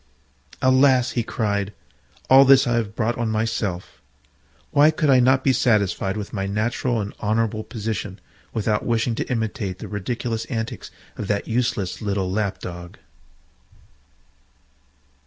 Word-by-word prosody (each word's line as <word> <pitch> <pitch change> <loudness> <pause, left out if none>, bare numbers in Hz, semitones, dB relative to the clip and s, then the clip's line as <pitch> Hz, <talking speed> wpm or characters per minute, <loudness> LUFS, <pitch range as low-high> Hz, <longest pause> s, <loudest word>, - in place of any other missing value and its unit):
"Alas!" 130 -1 +4
he 120 - 0
cried, 105 -3 -2 0.5
"all 135 +1 +8
this 135 0 +6
I 120 - 0
have 110 -3 -1
brought 115 +1 -1
on 115 -2 0
myself. 110 -4 -3 0.7
Why 145 +2 +6
could 155 -2 +1
I 130 - +6
not 130 +1 +3
be 135 - +3
satisfied 105 -4 +1
with 105 -1 -6
my 100 -2 -2
natural 115 +3 -1
and 100 -1 -4
honourable 110 0 0
position, 105 -3 -5 0.3
without 105 -1 -1
wishing 115 0 0
to - - -4
imitate 110 -5 -2
the - - -8
ridiculous 115 +3 -3
antics 115 -2 -5 0.3
of 105 - -4
that 100 0 -1
useless 115 -5 -1
little 100 -3 -1
Lap 100 -1 -1
dog?" 85 -1 -8
110 Hz, 140 wpm, -22 LUFS, 100-120 Hz, 0.7 s, all